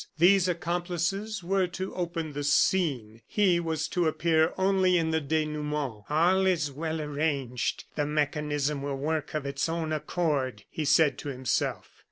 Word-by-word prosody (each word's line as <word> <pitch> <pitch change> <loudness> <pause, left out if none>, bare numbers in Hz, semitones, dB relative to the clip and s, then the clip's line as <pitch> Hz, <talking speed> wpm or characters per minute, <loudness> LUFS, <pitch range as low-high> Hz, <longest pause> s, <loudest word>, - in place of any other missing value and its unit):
These 185 +2 +5
accomplices 175 +4 -2
were 190 +1 +1
to 185 +2 -5
open 170 -3 -3
the 145 +1 -3
scene; 140 - +1
he 190 -5 +3
was 160 -2 -2
to 175 -2 +1
appear 160 0 +2
only 190 -1 +3
in 160 -1 +1
the 160 0 +1
denouement. 150 -6 -2
"All 180 +5 +3
is 160 -6 +1
well 160 +3 -3
arranged; 145 -4 -2
the 145 -1 0
mechanism 150 -1 -1
will 140 -1 -3
work 155 +2 -2
of 150 -2 -2
its 140 +3 -1
own 165 -1 -2
accord," 145 - -1
he 155 - -3
said 150 0 +4
to 145 - -5
himself. 130 -3 -2
160 Hz, 155 wpm, -28 LUFS, 145-175 Hz, -, These